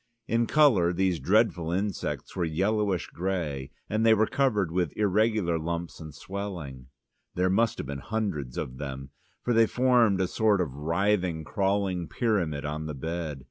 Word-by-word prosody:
In 115 Hz, 0 st, +1 dB
colour 120 Hz, -, +4 dB
these 90 Hz, -2 st, +1 dB
dreadful 95 Hz, -5 st, +2 dB
insects 90 Hz, -7 st, -3 dB
were 90 Hz, -, 0 dB
yellowish 95 Hz, +3 st, 0 dB
grey, 80 Hz, -7 st, -3 dB, 0.2 s
and 110 Hz, +1 st, 0 dB
they 110 Hz, -1 st, +6 dB
were 110 Hz, +1 st, +3 dB
covered 105 Hz, -10 st, +1 dB
with 90 Hz, -3 st, -1 dB
irregular 105 Hz, -4 st, +2 dB
lumps 85 Hz, +1 st, -4 dB
and 80 Hz, -1 st, -8 dB
swellings. 80 Hz, -6 st, -6 dB, 0.5 s
There 90 Hz, +1 st, +2 dB
must 115 Hz, +3 st, +2 dB
have -, -, -4 dB
been 70 Hz, +1 st, -5 dB
hundreds 90 Hz, -, -3 dB
of 65 Hz, 0 st, -5 dB
them, 70 Hz, -1 st, -6 dB, 0.3 s
for 120 Hz, -, +1 dB
they 115 Hz, -1 st, +5 dB
formed 120 Hz, -6 st, +3 dB
a 95 Hz, -, +1 dB
sort 105 Hz, 0 st, +2 dB
of 80 Hz, -8 st, -1 dB
writhing, 85 Hz, +2 st, 0 dB
crawling 95 Hz, -2 st, 0 dB
pyramid 85 Hz, -10 st, -1 dB
on 75 Hz, +1 st, -3 dB
the 75 Hz, -, -5 dB
bed. 80 Hz, 0 st, -4 dB
90 Hz, 160 wpm, -27 LUFS, 80-105 Hz, 0.5 s, they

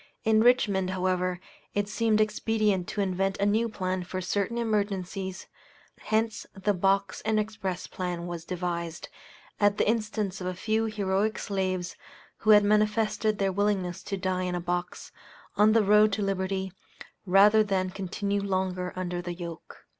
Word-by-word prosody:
In 220 Hz, -1 st, +4 dB
Richmond, 210 Hz, -6 st, +3 dB
however, 185 Hz, -1 st, 0 dB, 0.4 s
it 205 Hz, 0 st, 0 dB
seemed 215 Hz, 0 st, +1 dB
expedient 215 Hz, -3 st, +1 dB
to 205 Hz, -, -2 dB
invent 195 Hz, 0 st, 0 dB
a 200 Hz, -, +1 dB
new 220 Hz, +3 st, +2 dB
plan 185 Hz, -3 st, -2 dB
for 185 Hz, +1 st, -5 dB
certain 200 Hz, +5 st, -1 dB
emergencies, 195 Hz, -4 st, -2 dB, 0.5 s
hence 220 Hz, 0 st, -1 dB
the 200 Hz, +1 st, 0 dB
Box 195 Hz, +1 st, +1 dB
and 220 Hz, 0 st, +1 dB
Express 200 Hz, -4 st, -3 dB
plan 180 Hz, -2 st, -4 dB
was 175 Hz, -2 st, -5 dB
devised, 170 Hz, -2 st, -4 dB, 0.5 s
at 205 Hz, 0 st, +3 dB
the -, -, +2 dB
instance 215 Hz, -3 st, -1 dB
of 180 Hz, -, -3 dB
a 185 Hz, -, -3 dB
few 220 Hz, +4 st, 0 dB
heroic 210 Hz, 0 st, 0 dB
slaves, 185 Hz, -3 st, -2 dB, 0.4 s
who 215 Hz, -, -3 dB
had 210 Hz, -1 st, +8 dB
manifested 215 Hz, +1 st, +2 dB
their 195 Hz, -1 st, +1 dB
willingness 190 Hz, -2 st, 0 dB
to 195 Hz, -, -4 dB
die 185 Hz, -1 st, -1 dB
in 180 Hz, -1 st, -2 dB
a -, -, -1 dB
box, 175 Hz, 0 st, -4 dB, 0.4 s
on 210 Hz, +1 st, +5 dB
the 225 Hz, -1 st, +4 dB
road 210 Hz, +1 st, +5 dB
to 210 Hz, -, -1 dB
liberty, 190 Hz, -1 st, -2 dB, 0.5 s
rather 205 Hz, +4 st, +6 dB
than 190 Hz, -3 st, -1 dB
continue 200 Hz, +1 st, -2 dB
longer 185 Hz, -2 st, -2 dB
under 180 Hz, -1 st, -3 dB
the 175 Hz, 0 st, -5 dB
yoke. 170 Hz, -2 st, -9 dB
195 Hz, 155 wpm, -27 LUFS, 185-210 Hz, 0.5 s, had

